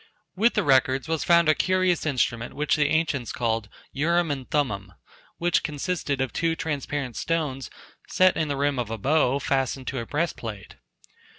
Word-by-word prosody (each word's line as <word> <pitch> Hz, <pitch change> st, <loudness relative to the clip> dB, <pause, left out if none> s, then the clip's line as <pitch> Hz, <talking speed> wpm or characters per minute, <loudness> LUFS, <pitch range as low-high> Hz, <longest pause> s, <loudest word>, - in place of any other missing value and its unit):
With 225 Hz, +5 st, +3 dB
the 210 Hz, -, +2 dB
records 135 Hz, -1 st, +3 dB
was 160 Hz, -1 st, -1 dB
found 170 Hz, -1 st, +4 dB
a 155 Hz, -, +6 dB
curious 185 Hz, -1 st, +1 dB
instrument 120 Hz, -4 st, -1 dB
which 150 Hz, 0 st, +1 dB
the 150 Hz, -1 st, +2 dB
ancients 150 Hz, -5 st, 0 dB
called 115 Hz, -3 st, -1 dB, 0.2 s
"Urim 170 Hz, +3 st, +1 dB
and 135 Hz, -3 st, -5 dB
Thummim," 100 Hz, -10 st, -1 dB, 0.4 s
which 175 Hz, 0 st, +2 dB
consisted 150 Hz, -2 st, -2 dB
of 130 Hz, -3 st, -2 dB
two 165 Hz, 0 st, 0 dB
transparent 145 Hz, -5 st, -3 dB
stones 150 Hz, -6 st, -2 dB, 0.4 s
set 185 Hz, 0 st, +4 dB
in 160 Hz, -, 0 dB
the 140 Hz, -1 st, -2 dB
rim 140 Hz, -1 st, 0 dB
of 120 Hz, -3 st, -2 dB
a 115 Hz, -, -3 dB
bow 140 Hz, +2 st, +2 dB
fastened 135 Hz, -1 st, -1 dB
to 135 Hz, -, -3 dB
a 115 Hz, -, -6 dB
breastplate. 115 Hz, -, -4 dB
145 Hz, 170 wpm, -25 LUFS, 130-165 Hz, 0.4 s, a